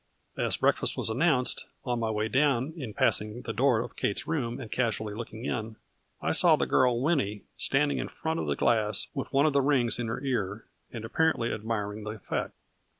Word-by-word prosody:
As - - 0
breakfast - - +2
was - - -1
announced, 130 -1 +1 0.2
on 120 -2 0
my 115 -1 0
way 110 0 0
down, 135 +2 +2
in 130 -10 -5
passing 105 +3 0
the 115 - -4
door 120 -1 +3
of - - -7
Kate's 100 - -1
room 125 -7 -2
and 115 -4 -8
casually 110 -4 -1
looking 115 +1 -7
in, 110 -3 -3 0.5
I - - +1
saw - - +5
the - - 0
girl 125 -2 +3
Winnie 125 -9 0
standing 145 +1 +1
in - - -2
front 160 +1 -3
of - - -2
the - - +1
glass, 110 -4 +2
with 135 -3 -4
one 140 +1 +4
of 155 - +3
the 140 - +4
rings 130 -4 +2
in 120 - -1
her 115 - -2
ear 110 -6 -2 0.3
and 115 -2 -6
apparently 140 -3 +1
admiring 105 -1 -3
the 105 - -5
effect. 105 - -4
120 Hz, 200 wpm, -29 LUFS, 110-135 Hz, 0.5 s, saw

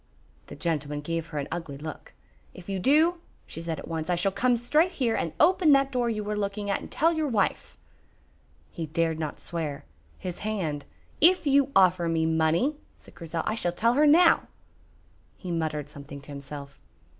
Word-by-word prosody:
The - - -9
gentleman 150 -4 -2
gave 165 +1 -3
her 155 -2 -7
an 140 - -2
ugly 165 -5 -5
look. 155 +2 -8 0.4
"If 175 - -12
you 195 -1 -2
do," 315 - +3 0.2
she 165 - -8
said 165 -1 -4
at - - -9
once, 160 0 -4
"I 175 - +3
shall 180 +3 +1
come 245 +4 +2
straight 305 +9 +2
here 240 -4 0
and 165 - -1
open 360 -5 +5
that 275 0 +3
door 245 -2 0
you 210 -2 -3
are - - -1
looking 205 0 -2
at, - - 0
and - - -9
tell 330 +2 +2
your 315 -2 -1
wife." 215 -7 -1 0.9
He 165 -2 -5
dared 160 +1 0
not 155 -2 -4
swear. 155 -4 -5 0.3
His 180 -2 -6
hand 180 -9 -3 0.4
"If 355 +2 +6
you 280 -1 +3
offer 180 -3 +4
me 165 -1 +1
money," 160 - +1 0.2
said - - -17
Grizel, 165 0 -4
"I - - 0
shall 175 -6 -1
tell 230 +6 +2
her 300 +4 +4
now." 330 +3 +5 0.9
He 180 - -6
muttered 155 -3 -2
something 140 -1 -10
to 140 - -12
himself. 140 - -9
175 Hz, 190 wpm, -27 LUFS, 160-250 Hz, 0.9 s, If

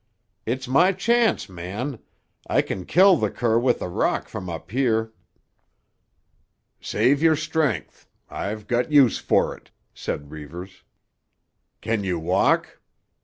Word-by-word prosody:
"It's 130 +3 -2
my 175 +9 +4
chance, 230 - +1
man. 100 +8 -6 0.5
I - - +2
can 95 -2 -5
kill 185 +1 +6
the - - 0
cur 115 -1 +1
with 125 0 +1
a - - -3
rock 90 - -1
from 90 - -6
up 85 +2 -7
here." 115 -3 0 1.7
"Save 140 +3 +1
your 160 -1 +5
strength; 150 - -2 0.2
I've 105 +1 -5
got 125 +4 -1
use 140 -6 +5
for - - +1
it," - - -21 0.2
said 75 0 -5
Reivers. 85 +5 -9 1.0
"Can 110 -2 -1
you 90 -2 -1
walk? 80 - +1
115 Hz, 125 wpm, -23 LUFS, 95-145 Hz, 1.7 s, kill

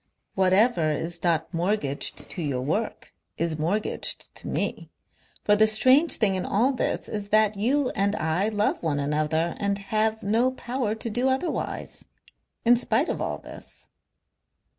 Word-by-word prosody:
Whatever 190 -2 +3
is 165 +3 -3
not 170 0 +1
mortgaged 170 -5 -2
to 180 - -6
your 135 -5 -2
work 205 - -3 0.2
is 165 -1 -2
mortgaged 195 +8 -2
to - - -10
me. - - -2 0.5
For 210 - +5
the 215 +1 +5
strange 260 +9 +5
thing 210 -4 +2
in 185 -1 -2
all 230 +7 +2
this 255 - -1
is 205 -1 -5
that 215 0 +3
you 255 +6 +1
and 200 0 0
I 160 +6 0
love 210 -1 0
one 150 -4 -1
another 155 +3 0
and 200 -1 0
have 215 +2 -1
no 230 +6 +2
power 245 -4 -3
to 225 +1 -5
do 245 +4 +1
otherwise. 265 +6 -3 0.6
In 240 +1 +6
spite 245 +5 +1
of - - -2
all - - -2
this. - - -13
205 Hz, 155 wpm, -25 LUFS, 170-225 Hz, 0.6 s, In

